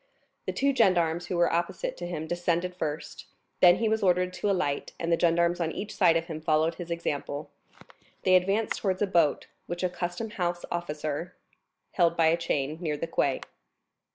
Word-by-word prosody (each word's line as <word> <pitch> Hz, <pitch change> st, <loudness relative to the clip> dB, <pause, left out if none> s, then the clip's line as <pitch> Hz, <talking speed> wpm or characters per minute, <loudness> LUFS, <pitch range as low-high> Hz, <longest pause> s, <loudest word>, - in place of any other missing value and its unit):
The -, -, +1 dB
two 280 Hz, +1 st, +1 dB
gendarmes 175 Hz, -6 st, +2 dB
who 180 Hz, -, -2 dB
were 170 Hz, 0 st, +3 dB
opposite 175 Hz, -, -1 dB
to 175 Hz, -, -5 dB
him 160 Hz, -3 st, -4 dB
descended 175 Hz, +1 st, -1 dB
first, 150 Hz, -3 st, -5 dB, 0.3 s
then 175 Hz, -1 st, +8 dB
he 230 Hz, -, 0 dB
was 220 Hz, 0 st, +1 dB
ordered 180 Hz, -1 st, +2 dB
to 205 Hz, -, -1 dB
alight 145 Hz, -7 st, -1 dB
and 170 Hz, 0 st, -2 dB
the 170 Hz, -, +3 dB
gendarmes 170 Hz, +1 st, +2 dB
on 165 Hz, -2 st, 0 dB
each 210 Hz, +4 st, -6 dB
side 170 Hz, -4 st, +5 dB
of 165 Hz, -, -2 dB
him 160 Hz, -2 st, -6 dB
followed 155 Hz, +1 st, +2 dB
his 175 Hz, 0 st, -8 dB
example. 150 Hz, -3 st, -3 dB, 0.7 s
They 185 Hz, -, +4 dB
advanced 195 Hz, +4 st, +1 dB
towards 190 Hz, -1 st, 0 dB
a -, -, +4 dB
boat, 170 Hz, -6 st, +2 dB, 0.2 s
which 175 Hz, +1 st, -4 dB
a 185 Hz, -, +2 dB
custom 175 Hz, +5 st, -4 dB
house 175 Hz, -3 st, -2 dB
officer 155 Hz, -1 st, -3 dB, 0.6 s
held 170 Hz, -2 st, +2 dB
by 165 Hz, -1 st, +5 dB
a 165 Hz, -, +4 dB
chain, 155 Hz, -2 st, -2 dB
near 155 Hz, -4 st, -1 dB
the 165 Hz, -, -2 dB
quay. 140 Hz, -4 st, 0 dB
175 Hz, 185 wpm, -28 LUFS, 160-180 Hz, 0.7 s, then